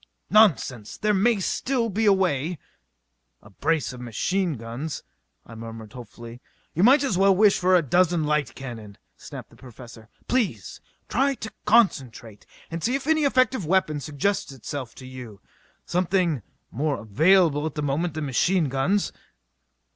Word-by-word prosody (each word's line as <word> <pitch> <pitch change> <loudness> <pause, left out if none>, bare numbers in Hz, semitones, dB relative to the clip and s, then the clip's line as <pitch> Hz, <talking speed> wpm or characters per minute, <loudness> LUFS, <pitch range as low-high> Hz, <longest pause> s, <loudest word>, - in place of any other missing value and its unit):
"Nonsense! 140 - +3
There 210 0 +1
may 210 +2 +2
still 240 +6 -1
be 220 +1 0
a - - +7
way 175 -4 0 0.4
" - - -50
"A 100 - -16
brace 155 +7 -1
of 125 - -10
machine 175 - -1
guns...." 120 +5 -6 0.4
I 115 - -13
murmured 115 -1 -9
hopefully. 120 0 -11 0.3
"You 170 - -1
might 265 +7 +6
as 205 -10 0
well 195 0 +5
wish 205 +1 +4
for 185 +1 +3
a 175 - +4
dozen 175 +3 +2
light 150 -1 -1
cannon!" 115 -6 -9 0.2
snapped - - -10
the - - -18
Professor. 120 -3 -13 0.2
"Please 190 - -2 0.3
try 275 +3 +1
to 220 -3 -7
concentrate, 130 - +1 0.2
and 165 0 -5
see 245 +3 +1
if 275 - -3
any 315 -1 +2
effective 260 -4 +2
weapon 160 -4 +1
suggests 150 +6 -2
itself 135 -1 -7
to 130 - -11
you 125 -5 -10 0.5
something 175 - 0 0.3
more 145 +2 -1
available 155 - +3
at 155 - -7
the 150 - -3
moment 150 +3 -1
than 155 -1 -3
machine 160 +4 +1
guns." 175 +10 0
155 Hz, 155 wpm, -24 LUFS, 125-195 Hz, 0.5 s, a